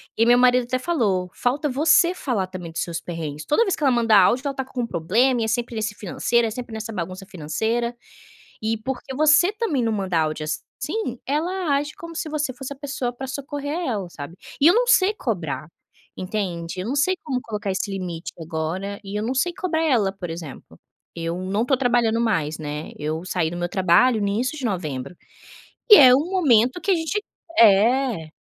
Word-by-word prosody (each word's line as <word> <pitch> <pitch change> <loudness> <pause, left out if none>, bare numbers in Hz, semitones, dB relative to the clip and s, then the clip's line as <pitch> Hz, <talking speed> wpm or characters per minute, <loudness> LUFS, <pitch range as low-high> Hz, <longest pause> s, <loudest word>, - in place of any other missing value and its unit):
E 230 - +3
meu 245 +1 +6
marido 250 0 +4
até 255 +1 -1
falou: 215 - 0
"Falta 280 +5 0
você 305 +6 +4
falar 240 - -2
também 180 -3 -8
dos 165 - -3
seus 170 -2 -5
perrengues, 155 -3 -6
toda 450 +10 +3
vez 385 - 0
que - - -6
ela 270 - +4
manda 230 -3 +3
áudio 235 +7 +5
ela 280 - 0
está 265 - -3
com 260 -1 -5
um 235 - -2
problema 230 +10 +1
e - - +1
é - - -2
sempre 235 +1 -1
nesse 215 -1 -2
financeiro, 230 +4 0
é 220 - -4
sempre 240 0 -7
nessa 220 0 -5
bagunça 185 +1 -5
financeira, 220 +9 -2 0.7
e 225 +1 0
porque 265 +4 -5
você 310 +5 +5
também 420 - -1
não 225 -1 0
manda 190 -5 -1
áudio 155 0 -2
assim, 240 - -4
ela 320 +2 0
age 290 +1 -2
como 335 0 -10
se 325 - -3
você 300 -3 -1
fosse 270 +1 -7
a 280 - -9
pessoa 270 -3 -3
para 265 +2 -6
socorrer 285 +2 -4
a 360 - -3
ela, 205 -7 -2
sabe". 145 +3 -8 0.3
E 290 - +5
eu 345 - +7
não - - +3
sei 420 -4 +4
cobrar, 180 - -3 0.5
entende, 185 -3 -4
eu 185 - -4
não 270 - -1
sei 370 +6 +3
como 260 -4 -2
colocar 210 -3 -4
esse 195 +2 -2
limite 180 -4 -5
agora 165 +5 -4
e 205 +1 -5
eu - - -2
não 245 +4 -2
sei 350 +7 +1
cobrar 325 -3 -1
ela. 225 -10 +2
Por 190 -3 -7
exemplo, 165 -5 -9 0.4
eu 165 0 -3
não 195 +4 -1
estou 260 +2 +2
trabalhando 240 -3 +2
mais, 160 -9 0
né, 150 0 -6
eu 155 +3 -3
saí 175 -3 -1
do 175 - -6
meu 175 0 -2
trabalho 195 +6 +3
no 200 - +1
início 245 +8 -1
de 270 - -6
novembro, 155 - -3 0.7
e - - +13
é 255 -2 +9
um 300 +7 +1
momento 260 - +3
que 395 - -1
a - - +5
gente 340 +5 -2 0.4
é. 225 -3 +4
230 Hz, 210 wpm, -23 LUFS, 185-275 Hz, 0.7 s, e